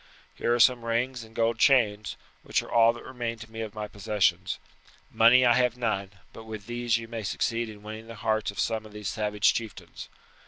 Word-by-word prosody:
Here - - -1
are - - -1
some 120 0 +5
rings 120 +2 -1
and 110 0 -16
gold 115 0 +1
chains, 110 -7 +3 0.2
which - - -1
are - - -12
all 115 0 +6
that 120 - -11
remain 120 -2 -4
to 110 0 -12
me 115 0 -6
of 110 -1 -6
my 105 0 -4
possessions. 105 -1 0 0.5
Money 120 +3 +6
I 120 - +6
have 125 -1 +2
none; 105 -5 -1 0.2
but 110 - -11
with 110 -2 -8
these 120 -1 0
you 115 0 -7
may 115 -1 -5
succeed 115 +3 -1
in 105 -1 -12
winning 110 +1 -8
the 115 - -9
hearts 110 0 -1
of 100 - -7
some 110 -1 0
of 105 - -16
these 105 -2 -4
savage 105 -1 +1
chieftains. 115 -4 -7
115 Hz, 210 wpm, -27 LUFS, 105-120 Hz, 0.5 s, all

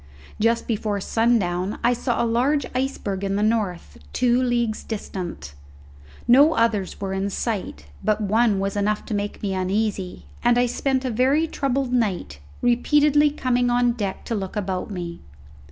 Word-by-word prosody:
Just 230 +2 +2
before 210 -2 -1
sundown 200 -4 +1
I 245 - +4
saw 240 0 -1
a - - +2
large 255 +5 +1
iceberg 250 -7 -2
in 195 0 -1
the 205 - +1
north, 210 -6 -1
two 245 0 +2
leagues 240 -3 0
distant; 180 - -6 0.7
no 280 +6 +6
others 215 -5 0
were 195 -1 -3
in 195 +1 -1
sight, 195 - -3 0.2
but 215 0 +1
one 215 0 +2
was 195 +1 -2
enough 210 +1 0
to - - -4
make 205 +1 -3
me 195 -2 -1
uneasy, 190 0 -2 0.2
and 240 0 +4
I 245 - +4
spent 265 +2 -1
a 255 - -1
very 265 +7 +2
troubled 275 -4 -1
night, 195 - -1 0.2
repeatedly 295 +4 +4
coming 250 -4 0
on 245 0 +3
deck 205 -5 -4
to - - -3
look 195 -2 -4
about 190 -2 -2
me. 175 -3 -6
225 Hz, 160 wpm, -23 LUFS, 195-245 Hz, 0.7 s, no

